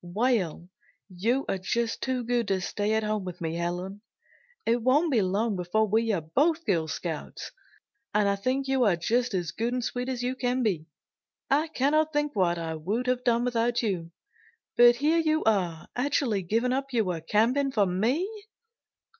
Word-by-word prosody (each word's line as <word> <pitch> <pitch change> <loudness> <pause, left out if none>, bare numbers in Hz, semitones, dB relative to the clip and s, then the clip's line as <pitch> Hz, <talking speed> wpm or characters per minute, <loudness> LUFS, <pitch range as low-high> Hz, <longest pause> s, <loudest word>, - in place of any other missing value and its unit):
"Well, 185 -3 0 0.5
you 235 +9 0
are 195 - -1
just 230 +5 -1
too 260 -2 -1
good 240 -1 0
to 195 -1 +1
stay 205 +3 -1
at 220 0 +1
home 215 -1 -1
with 180 -1 -7
me, 165 -1 -3
Helen. 175 +4 -4 0.6
It 235 +1 +2
won't 290 +7 +3
be 235 -5 +3
long 200 +3 0
before 185 +5 0
we 225 +2 +1
are 190 -5 0
both 310 - +1
Girl 170 -7 +1
Scouts. 160 -1 -5 0.6
And 210 -1 +2
I 200 - +2
think 260 +7 -1
you 265 -1 +2
are 195 -5 +4
just 235 +6 0
as 175 -3 -2
good 235 +2 -2
and 250 -1 -1
sweet 250 +2 -3
as 250 -2 -3
you 250 +1 0
can 250 0 0
be. 175 -8 -1 0.6
I 300 +4 +3
can't 310 +2 +1
think 295 -1 -1
what 175 -3 +2
I 165 -1 -3
would 200 +11 -2
have 250 0 0
done 240 -1 +2
without 240 0 0
you. 180 -6 -2 0.7
But 240 0 +7
here 305 +6 +2
you 315 -1 +1
are 180 -7 0
actually 250 -5 0
giving 230 +8 0
up 270 +1 -2
your 185 -9 0
camping 240 - +2
for 210 -6 +3
me." 225 - 0
225 Hz, 180 wpm, -27 LUFS, 185-255 Hz, 0.7 s, But